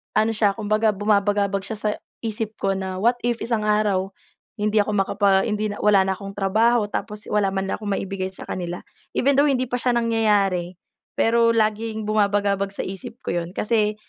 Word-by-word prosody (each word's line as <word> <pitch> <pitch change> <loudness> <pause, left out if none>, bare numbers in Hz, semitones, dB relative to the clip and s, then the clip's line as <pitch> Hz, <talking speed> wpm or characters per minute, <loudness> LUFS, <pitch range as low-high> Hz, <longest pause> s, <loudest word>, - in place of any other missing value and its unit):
ano 220 +1 +3
siya, 210 -2 +1
kumbaga 215 0 +1
bumabagabag 200 -1 +1
siya 220 - -4
sa 210 - 0 0.3
isip 220 -1 -2
ko 195 0 +1
na, 190 -1 -4
'What 240 +4 +3
if 240 -1 0
isang 230 -3 -1
araw, 205 -2 +1 0.5
hindi 210 +1 +1
ako 210 - -3
makapa 195 0 +2
hindi 210 0 -1
na - - -7
wala 200 -2 +5
na 190 - 0
akong 195 +1 -9
trabaho, 215 +3 +2
tapos 210 -1 -4
wala 210 -1 +2
man 195 0 -2
lang - - -1
akong 205 - -4
maibigay 195 -1 -3
sa - - -8
kanila." 175 -1 -5 0.3
Even 275 +1 +3
though 295 - +5
hindi 255 -1 +1
pa - - +1
siya 250 - +2
nangyayari, 205 -6 +1 0.4
pero 230 0 +4
laging 220 0 0
bumabagabag 200 -2 +1
sa - - -2
isip 195 +5 -7
ko - - -1
yun 170 - -8
kasi, 215 -1 +1
210 Hz, 185 wpm, -23 LUFS, 195-220 Hz, 0.5 s, wala